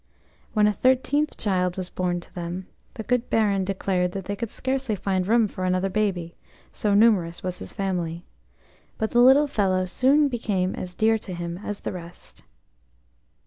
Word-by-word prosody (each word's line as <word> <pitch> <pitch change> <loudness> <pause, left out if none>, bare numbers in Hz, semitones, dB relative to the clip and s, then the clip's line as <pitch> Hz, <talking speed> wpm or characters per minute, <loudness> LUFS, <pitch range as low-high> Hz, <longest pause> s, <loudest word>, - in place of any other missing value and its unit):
When 210 -2 +4
a 210 - +3
thirteenth 260 +6 +1
child 180 -3 0
was 185 -1 -4
born 175 -1 -1
to - - -18
them, 175 +1 -5 0.3
the 220 - -5
good 250 +1 0
Baron 205 -3 +2
declared 185 -1 -1
that 195 -2 -5
they 205 - -3
could 230 +2 -4
scarcely 260 -3 -2
find 190 -1 -1
room 225 0 +4
for 185 - -6
another 185 +1 +1
baby, 185 -5 -1 0.4
so 205 -2 0
numerous 200 -6 +3
was 185 -1 -3
his - - -7
family; 175 -3 -3 0.7
but 220 - -2
the 240 - +3
little 265 +4 +7
fellow 190 -8 +1
soon 275 +10 +3
became 205 -7 -1
as 180 0 -6
dear 220 +2 +3
to 190 -4 -7
him 170 0 -5
as 205 0 -5
the - - -3
rest. 175 -1 -10
195 Hz, 175 wpm, -25 LUFS, 180-225 Hz, 0.7 s, little